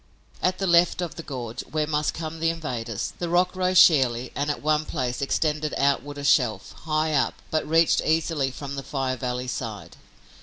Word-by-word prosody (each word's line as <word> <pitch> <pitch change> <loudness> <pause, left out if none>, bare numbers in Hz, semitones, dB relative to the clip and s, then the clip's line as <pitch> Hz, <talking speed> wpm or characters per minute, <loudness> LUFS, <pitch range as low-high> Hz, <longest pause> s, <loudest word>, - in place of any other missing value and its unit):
At 185 0 +1
the 195 - -2
left 170 -1 +4
of 175 -3 -3
the - - -7
gorge, 125 -7 -6
where 155 -1 -2
must 150 0 -1
come 160 0 -5
the 165 0 +2
invaders, 125 -10 -4
the 175 - -2
rock 180 +2 +2
rose 185 0 +1
sheerly 130 -8 +5
and 145 +1 -2
at 145 - -1
one 155 0 +2
place 125 -4 -3
extended 150 +1 0
outward 140 +1 0
a 145 - -6
shelf, 120 -8 +2
high 155 0 0
up, 140 -3 +1 0.2
but 155 -1 -1
reached 165 +1 +4
easily 155 -3 0
from 140 +1 -7
the 135 - -4
Fire 135 -2 -2
Valley 125 0 -3
side. - - -6
150 Hz, 190 wpm, -25 LUFS, 130-165 Hz, 0.2 s, sheerly